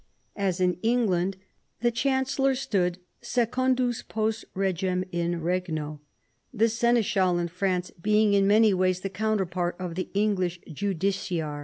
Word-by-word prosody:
As 195 Hz, -3 st, -1 dB
in 180 Hz, -1 st, +1 dB
England, 195 Hz, -6 st, +1 dB, 0.4 s
the 240 Hz, 0 st, +3 dB
chancellor 270 Hz, +2 st, +1 dB
stood 185 Hz, -9 st, 0 dB, 0.2 s
secundus 250 Hz, 0 st, 0 dB
post 220 Hz, 0 st, -2 dB
regem 185 Hz, -1 st, 0 dB
in 170 Hz, -1 st, -1 dB
regno, 160 Hz, -4 st, -2 dB, 0.5 s
the 225 Hz, -2 st, +2 dB
seneschal 220 Hz, -6 st, +2 dB
in 170 Hz, 0 st, -1 dB
France 180 Hz, 0 st, -1 dB
being 210 Hz, +1 st, +3 dB
in 195 Hz, -1 st, +4 dB
many 215 Hz, 0 st, +5 dB
ways 185 Hz, 0 st, +1 dB
the 195 Hz, -, -3 dB
counterpart 185 Hz, -4 st, -1 dB
of 180 Hz, -2 st, -5 dB
the 185 Hz, +2 st, -4 dB
English 190 Hz, -4 st, +1 dB
justiciar. 175 Hz, -3 st, -2 dB
195 Hz, 130 wpm, -27 LUFS, 180-220 Hz, 0.5 s, many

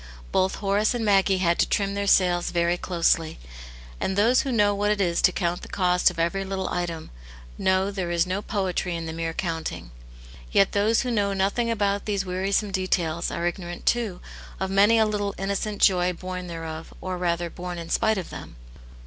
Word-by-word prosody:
Botl; 185 Hz, 0 st, +3 dB
jL. -, -, -6 dB
Horace 205 Hz, +3 st, +2 dB
and 230 Hz, -2 st, -2 dB
Maggie 195 Hz, -1 st, +3 dB
had 170 Hz, -2 st, +1 dB
to -, -, +2 dB
trim 200 Hz, -1 st, 0 dB
their 200 Hz, 0 st, -2 dB
sails 180 Hz, -2 st, +3 dB
very 170 Hz, 0 st, +1 dB
closely; 170 Hz, -3 st, 0 dB, 0.6 s
and 190 Hz, -, -1 dB
those 235 Hz, +5 st, +4 dB
who 270 Hz, -, -3 dB
know 205 Hz, -3 st, +3 dB
what 205 Hz, +1 st, 0 dB
it 210 Hz, -1 st, +1 dB
is 175 Hz, -3 st, +1 dB
to -, -, +5 dB
count 175 Hz, 0 st, -2 dB
the. -, -, -9 dB
cost 180 Hz, -2 st, +2 dB
of -, -, -10 dB
every 170 Hz, +4 st, 0 dB
little 190 Hz, -1 st, -3 dB
item, 170 Hz, -2 st, -4 dB, 0.4 s
know 190 Hz, -, +1 dB
there 190 Hz, -3 st, -3 dB
is 170 Hz, 0 st, +2 dB
no 185 Hz, +2 st, -2 dB
poetry 190 Hz, -4 st, -2 dB
in 165 Hz, 0 st, -4 dB
the 160 Hz, -, -5 dB
mere 165 Hz, 0 st, -3 dB
counting? 165 Hz, -, -4 dB, 0.6 s
Yet 195 Hz, -, +4 dB
those 210 Hz, +3 st, +2 dB
who 250 Hz, -, -2 dB
know 200 Hz, -3 st, +1 dB
nothing^ 200 Hz, +5 st, 0 dB
about 200 Hz, -2 st, 0 dB
these 200 Hz, -2 st, -1 dB
wearisome 195 Hz, +3 st, 0 dB
details, 175 Hz, -3 st, -1 dB
are 170 Hz, -, -3 dB
ignorant, 175 Hz, 0 st, -4 dB
too, 225 Hz, -7 st, 0 dB, 0.4 s
of 190 Hz, 0 st, -2 dB
many 205 Hz, +4 st, +5 dB
a 220 Hz, -, +5 dB
little 205 Hz, -1 st, -2 dB
innocent 200 Hz, +2 st, -2 dB
joy 180 Hz, -1 st, +4 dB
born 185 Hz, +1 st, -6 dB
thereof, 165 Hz, -1 st, -7 dB
or 185 Hz, -1 st, -4 dB
rather, 170 Hz, -1 st, -1 dB
born 180 Hz, 0 st, -6 dB
in 165 Hz, -1 st, -7 dB
spite 220 Hz, -1 st, +2 dB
of 185 Hz, -, -5 dB
them. -, -, -9 dB
190 Hz, 200 wpm, -25 LUFS, 175-200 Hz, 0.6 s, to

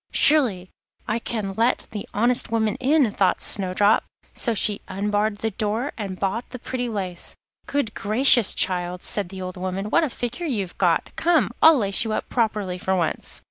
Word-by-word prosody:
'Surely 225 Hz, -12 st, +3 dB, 0.4 s
I 220 Hz, +2 st, -1 dB
can 215 Hz, -4 st, -4 dB
let 230 Hz, +4 st, +1 dB
the 210 Hz, -2 st, -7 dB
honest 240 Hz, +4 st, 0 dB
woman 220 Hz, -2 st, 0 dB
in,' 270 Hz, -3 st, +2 dB
thought 190 Hz, -2 st, +1 dB
Snowdrop; 200 Hz, +2 st, +1 dB, 0.3 s
so 235 Hz, -3 st, -1 dB
she 205 Hz, 0 st, +1 dB
unbarred 205 Hz, +1 st, -1 dB
the 220 Hz, +1 st, -2 dB
door 220 Hz, +7 st, -2 dB
and 195 Hz, -4 st, -6 dB
bought 200 Hz, +5 st, -2 dB
the 255 Hz, -, -7 dB
pretty 245 Hz, 0 st, -4 dB
lace. 185 Hz, -5 st, -4 dB, 0.3 s
'Good 280 Hz, -7 st, -1 dB
gracious! 220 Hz, +2 st, +5 dB
child,' 180 Hz, -1 st, 0 dB
said 200 Hz, -4 st, -2 dB
the 190 Hz, 0 st, -7 dB
old 185 Hz, 0 st, -7 dB
woman, 185 Hz, +3 st, -4 dB
'what 335 Hz, -, +3 dB
a 310 Hz, -, 0 dB
figure 245 Hz, +7 st, -5 dB
you've 200 Hz, -, -3 dB
got. 175 Hz, -3 st, +1 dB
Come! 335 Hz, -1 st, +2 dB
I'll 320 Hz, -1 st, +8 dB
lace 200 Hz, -4 st, +3 dB
you 220 Hz, -2 st, -3 dB
up -, -, -3 dB
properly 210 Hz, -6 st, -1 dB
for 190 Hz, +1 st, 0 dB
once. 170 Hz, -3 st, -2 dB
210 Hz, 180 wpm, -23 LUFS, 190-240 Hz, 0.4 s, I'll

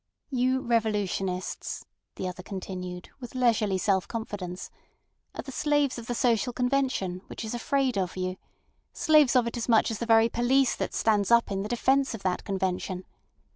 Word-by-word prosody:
"You 260 Hz, 0 st, +1 dB
revolutionists," 205 Hz, -5 st, -1 dB, 0.3 s
the 185 Hz, -, -3 dB
other 180 Hz, 0 st, -6 dB
continued, 180 Hz, -2 st, -6 dB
with 245 Hz, -1 st, -9 dB
leisurely 225 Hz, -6 st, +2 dB
self 190 Hz, 0 st, +1 dB
confidence, 200 Hz, -6 st, -5 dB, 0.6 s
"are -, -, -5 dB
the 270 Hz, -, -8 dB
slaves 290 Hz, -2 st, +1 dB
of 230 Hz, -, -9 dB
the 245 Hz, -, -2 dB
social 240 Hz, -1 st, +2 dB
convention, 250 Hz, -8 st, 0 dB
which -, -, -6 dB
is 220 Hz, -, -4 dB
afraid 255 Hz, -2 st, 0 dB
of 185 Hz, -1 st, -2 dB
you; 185 Hz, 0 st, -2 dB, 0.6 s
slaves 305 Hz, -6 st, +4 dB
of 250 Hz, -2 st, +5 dB
it 235 Hz, +1 st, -3 dB
as 235 Hz, -, -3 dB
much 225 Hz, 0 st, +4 dB
as 220 Hz, -, -4 dB
the 235 Hz, -, -3 dB
very 225 Hz, 0 st, +6 dB
police 250 Hz, +3 st, +2 dB
that -, -, -3 dB
stands 210 Hz, -3 st, +2 dB
up 235 Hz, -2 st, +4 dB
in 195 Hz, 0 st, -1 dB
the 210 Hz, -, -4 dB
defence 265 Hz, +2 st, +2 dB
of 215 Hz, -, -10 dB
that 185 Hz, -1 st, -1 dB
convention. 185 Hz, -1 st, -2 dB
225 Hz, 175 wpm, -27 LUFS, 190-250 Hz, 0.6 s, very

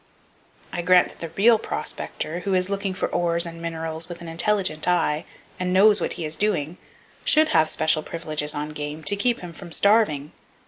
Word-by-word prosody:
I 175 Hz, -, -2 dB
grant 180 Hz, 0 st, +4 dB
that -, -, -13 dB
the 165 Hz, -, -5 dB
real 225 Hz, +2 st, +6 dB
prospector, 170 Hz, -5 st, -5 dB
who 190 Hz, +1 st, -1 dB
is 185 Hz, +1 st, 0 dB
looking 195 Hz, -1 st, -2 dB
for -, -, -1 dB
ores 170 Hz, 0 st, +1 dB
and 165 Hz, 0 st, -8 dB
minerals 165 Hz, 0 st, -4 dB
with 175 Hz, -1 st, -7 dB
an 170 Hz, -, -9 dB
intelligent 180 Hz, -1 st, 0 dB
eye, 170 Hz, -3 st, +1 dB, 0.3 s
and 180 Hz, 0 st, -1 dB
knows 205 Hz, +1 st, +5 dB
what -, -, -1 dB
he 165 Hz, -, -5 dB
is 155 Hz, +1 st, -1 dB
doing, 175 Hz, -4 st, -1 dB, 0.5 s
should 310 Hz, 0 st, +5 dB
have 160 Hz, -, +3 dB
special 155 Hz, 0 st, +1 dB
privileges 155 Hz, -2 st, -2 dB
on 150 Hz, +1 st, -3 dB
game, 150 Hz, +1 st, -6 dB
to 205 Hz, -, +2 dB
keep 235 Hz, +4 st, 0 dB
him 175 Hz, -2 st, -8 dB
from 175 Hz, +1 st, -11 dB
starving. 185 Hz, -8 st, +2 dB
170 Hz, 190 wpm, -23 LUFS, 155-195 Hz, 0.5 s, real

